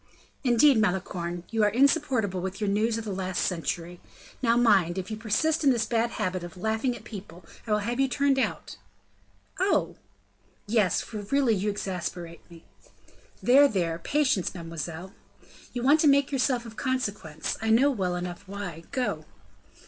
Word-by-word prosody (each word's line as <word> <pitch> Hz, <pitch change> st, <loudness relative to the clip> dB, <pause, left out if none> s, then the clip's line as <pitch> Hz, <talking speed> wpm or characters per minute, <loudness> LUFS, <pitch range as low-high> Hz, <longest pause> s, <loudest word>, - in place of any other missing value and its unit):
"Indeed, 255 Hz, +1 st, +5 dB
Malicorne, 175 Hz, -3 st, -1 dB
you 225 Hz, -1 st, +1 dB
are 210 Hz, -, +5 dB
insupportable 235 Hz, -, +2 dB
with 190 Hz, +2 st, -5 dB
your 210 Hz, -, -1 dB
news 220 Hz, +3 st, +1 dB
of 225 Hz, -, -4 dB
the 205 Hz, -, -3 dB
last 185 Hz, -1 st, -2 dB
century. 175 Hz, 0 st, -3 dB, 0.4 s
Now, 235 Hz, -2 st, +3 dB
mind, 195 Hz, -7 st, +3 dB
if 190 Hz, +3 st, -4 dB
you -, -, -2 dB
persist 240 Hz, +10 st, 0 dB
in 280 Hz, -, +5 dB
this 235 Hz, -4 st, +2 dB
bad 235 Hz, 0 st, +1 dB
habit 185 Hz, -1 st, -2 dB
of 175 Hz, +1 st, -9 dB
laughing 220 Hz, +6 st, -1 dB
at -, -, -11 dB
people, 185 Hz, -5 st, -10 dB, 0.2 s
I -, -, -3 dB
will 210 Hz, -, +4 dB
have 240 Hz, +2 st, -2 dB
you 270 Hz, -, +3 dB
turned 275 Hz, +1 st, +1 dB
out." 190 Hz, -, -3 dB, 0.8 s
"Oh!" -, -, +1 dB, 0.7 s
"Yes, 210 Hz, -4 st, +2 dB
for 220 Hz, -, -8 dB
really 240 Hz, +4 st, +1 dB
you 205 Hz, +1 st, 0 dB
exasperate 180 Hz, -4 st, -5 dB
me." 170 Hz, -1 st, -14 dB, 0.8 s
"There, 275 Hz, +4 st, +7 dB
there. 170 Hz, -8 st, -1 dB
Patience, 265 Hz, -, 0 dB
mademoiselle." 170 Hz, +2 st, -6 dB, 0.6 s
"You 245 Hz, -1 st, -4 dB
want 290 Hz, +4 st, +5 dB
to 305 Hz, -, +4 dB
make 280 Hz, 0 st, +4 dB
yourself 255 Hz, -3 st, 0 dB
of 225 Hz, -1 st, -10 dB
consequence; 205 Hz, -, -3 dB
I 220 Hz, -, -1 dB
know 255 Hz, +6 st, +5 dB
well 185 Hz, -8 st, -1 dB
enough 175 Hz, 0 st, -5 dB
why. 185 Hz, -5 st, -7 dB
Go!" 255 Hz, -2 st, -2 dB
210 Hz, 165 wpm, -27 LUFS, 180-250 Hz, 0.8 s, There